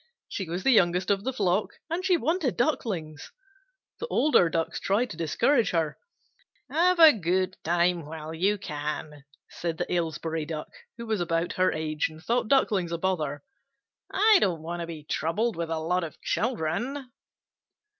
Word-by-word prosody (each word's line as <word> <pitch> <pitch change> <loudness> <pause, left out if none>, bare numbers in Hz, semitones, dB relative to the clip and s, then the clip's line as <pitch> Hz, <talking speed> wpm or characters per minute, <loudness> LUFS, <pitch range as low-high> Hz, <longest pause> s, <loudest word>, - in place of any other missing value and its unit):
She 190 -4 -5
was 175 +2 -3
the 270 - +4
youngest 180 -3 +3
of 200 0 +1
the 260 - -1
flock, 200 -4 0
and 335 +3 -3
she 370 -2 +3
wanted 325 -4 0
Ducklings. 190 - -2 0.7
The 475 - -4
older 265 - +3
Ducks 165 0 -2
tried 225 +5 0
to - - -6
discourage 215 - +2
her. 160 -3 -1 0.7
"Have 360 +2 +3
a 320 -2 +9
good 185 -2 0
time 170 -1 +1
while 160 0 -7
you 195 +6 +1
can," 150 -4 -5 0.3
said 170 -2 -4
the 175 - -2
Aylesbury 165 -1 -2
Duck, 155 -1 -5 0.3
who 235 - -6
was 220 -4 -1
about 165 0 -1
her 185 0 +2
age, 155 -1 -1
and 155 0 -13
thought 235 +7 0
Ducklings 205 -9 +2
a 170 - -1
bother. 155 -6 -2 0.7
"I 420 +1 +5
don't 170 -5 0
want 170 +2 -4
to 170 - -4
be 160 -3 -8
troubled 175 +10 -1
with 170 -1 -3
a 165 - -1
lot 175 +3 0
of 160 - -7
children." 240 - -2
175 Hz, 165 wpm, -27 LUFS, 160-235 Hz, 0.7 s, a